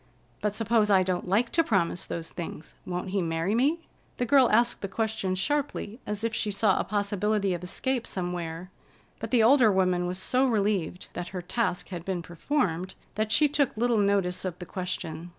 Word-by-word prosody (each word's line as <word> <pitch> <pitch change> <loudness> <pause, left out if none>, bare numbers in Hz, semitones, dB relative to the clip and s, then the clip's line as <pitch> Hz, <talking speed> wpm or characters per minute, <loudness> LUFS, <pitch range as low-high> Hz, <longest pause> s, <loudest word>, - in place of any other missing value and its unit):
"But 210 -1 -1
suppose 220 -1 +2
I 190 -2 +5
don't 180 -1 -2
like 215 +6 +2
to 330 - +4
promise 185 - 0
those 165 -1 -5
things? 165 -2 -7
Won't 180 +1 -3
he 195 -1 +1
marry 165 +3 -1
me?" 285 +8 +2 0.4
The 245 - 0
girl 260 0 +5
asked 235 +2 +2
the 195 - -2
question 195 -2 -1
sharply, 265 0 -2
as 210 +1 -3
if 230 0 -1
she 215 - 0
saw 200 -1 +2
a - - +1
possibility 205 -1 0
of 175 0 -5
escape 250 +6 -2
somewhere; 175 -1 -4 0.5
but - - -5
the 240 -3 +4
older 240 -2 +6
woman 185 -2 +2
was 180 +1 -3
so 255 +8 +2
relieved 200 -6 0
that 175 0 -5
her - - -3
task 180 -2 -1
had 175 -3 -6
been 180 -2 -3
performed 180 - -1 0.2
that 215 0 -1
she 300 - +5
took 285 -5 0
little 235 -1 +2
notice 200 -3 +1
of 180 -2 -4
the 180 - -8
question. 175 -2 -5
200 Hz, 190 wpm, -27 LUFS, 180-230 Hz, 0.5 s, older